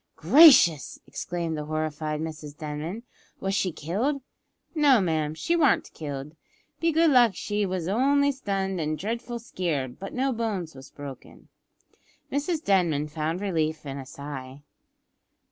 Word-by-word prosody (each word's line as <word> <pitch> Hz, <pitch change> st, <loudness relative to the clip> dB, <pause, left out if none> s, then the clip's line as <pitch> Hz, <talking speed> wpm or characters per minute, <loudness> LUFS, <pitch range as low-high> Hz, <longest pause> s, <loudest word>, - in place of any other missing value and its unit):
"Gracious!" 265 Hz, -, +6 dB
exclaimed 170 Hz, -2 st, -4 dB
the 150 Hz, -1 st, -4 dB
horrified 155 Hz, 0 st, -3 dB
Mrs 155 Hz, -2 st, -6 dB
Denman, 155 Hz, +8 st, -5 dB, 0.4 s
"was 195 Hz, 0 st, -2 dB
she 190 Hz, -2 st, +1 dB
killed?" 210 Hz, -, -2 dB, 0.5 s
"No, 290 Hz, -6 st, +5 dB
ma'am, 160 Hz, -4 st, 0 dB
she 335 Hz, -, 0 dB
warn't 300 Hz, -7 st, +2 dB
killed. 145 Hz, 0 st, -6 dB, 0.4 s
Be 330 Hz, 0 st, +2 dB
good 325 Hz, 0 st, +4 dB
luck 240 Hz, -7 st, +5 dB
they 205 Hz, -1 st, +1 dB
was 180 Hz, -3 st, -3 dB
only 280 Hz, +7 st, +3 dB
stunned 195 Hz, -8 st, -2 dB
an' 155 Hz, 0 st, -1 dB
dreadful 235 Hz, +6 st, -4 dB
skeared, 160 Hz, -, -3 dB
but 195 Hz, -, -6 dB
no 265 Hz, +1 st, +1 dB
bones 210 Hz, -8 st, -3 dB
was 135 Hz, 0 st, -12 dB
broken." 140 Hz, -2 st, -11 dB, 0.8 s
Mrs 305 Hz, +3 st, -1 dB
Denman 165 Hz, -7 st, +2 dB
found 160 Hz, +4 st, -3 dB
relief 160 Hz, -6 st, -1 dB
in 140 Hz, 0 st, -5 dB
a 135 Hz, -, -8 dB
sigh. 140 Hz, -1 st, -8 dB
175 Hz, 140 wpm, -26 LUFS, 150-235 Hz, 0.8 s, Gracious